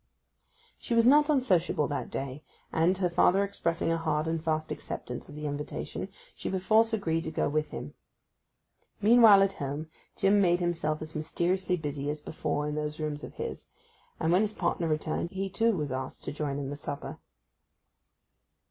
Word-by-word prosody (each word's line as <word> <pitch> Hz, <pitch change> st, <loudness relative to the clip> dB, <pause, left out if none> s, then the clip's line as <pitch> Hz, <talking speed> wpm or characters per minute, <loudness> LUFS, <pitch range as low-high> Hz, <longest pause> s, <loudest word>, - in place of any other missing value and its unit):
She 235 Hz, -, -2 dB
was 230 Hz, 0 st, +5 dB
not 295 Hz, +4 st, +6 dB
unsociable 185 Hz, -, +2 dB
that 145 Hz, -, -3 dB
day, 135 Hz, +1 st, -5 dB, 0.3 s
and, 170 Hz, +4 st, +3 dB
her 185 Hz, -1 st, +2 dB
father 180 Hz, +3 st, +4 dB
expressing 170 Hz, -4 st, -1 dB
a 165 Hz, -, +1 dB
hard 155 Hz, -1 st, 0 dB
and 160 Hz, -1 st, -1 dB
fast 155 Hz, -1 st, -1 dB
acceptance -, -, -6 dB
of -, -, -10 dB
the 150 Hz, 0 st, -6 dB
invitation, 145 Hz, 0 st, -4 dB, 0.2 s
she -, -, -5 dB
perforce 215 Hz, +5 st, +3 dB
agreed 165 Hz, -7 st, 0 dB
to -, -, -2 dB
go 160 Hz, -, 0 dB
with 155 Hz, +1 st, 0 dB
him. -, -, -7 dB, 1.1 s
Meanwhile 215 Hz, -2 st, +7 dB
at 195 Hz, 0 st, +1 dB
home, 145 Hz, +3 st, -4 dB, 0.3 s
Jim 200 Hz, +1 st, +4 dB
made 175 Hz, -2 st, +3 dB
himself 165 Hz, -3 st, -1 dB
as 155 Hz, 0 st, -9 dB
mysteriously 180 Hz, +4 st, 0 dB
busy 145 Hz, -2 st, -3 dB
as 150 Hz, +1 st, -2 dB
before 150 Hz, 0 st, -2 dB
in 150 Hz, -, -2 dB
those 150 Hz, 0 st, -3 dB
rooms 150 Hz, -1 st, -3 dB
of -, -, -9 dB
his, -, -, -5 dB, 0.5 s
and 160 Hz, -, +1 dB
when 180 Hz, +3 st, +5 dB
his 215 Hz, 0 st, -1 dB
partner 170 Hz, -, 0 dB
returned 155 Hz, +2 st, -1 dB
he 195 Hz, +1 st, -4 dB
too 225 Hz, 0 st, +2 dB
was 150 Hz, -4 st, -2 dB
asked 130 Hz, 0 st, -5 dB
to -, -, -3 dB
join 145 Hz, -2 st, -3 dB
in 140 Hz, -1 st, -4 dB
the -, -, -4 dB
supper. 145 Hz, 0 st, -5 dB
165 Hz, 175 wpm, -29 LUFS, 150-195 Hz, 1.1 s, Meanwhile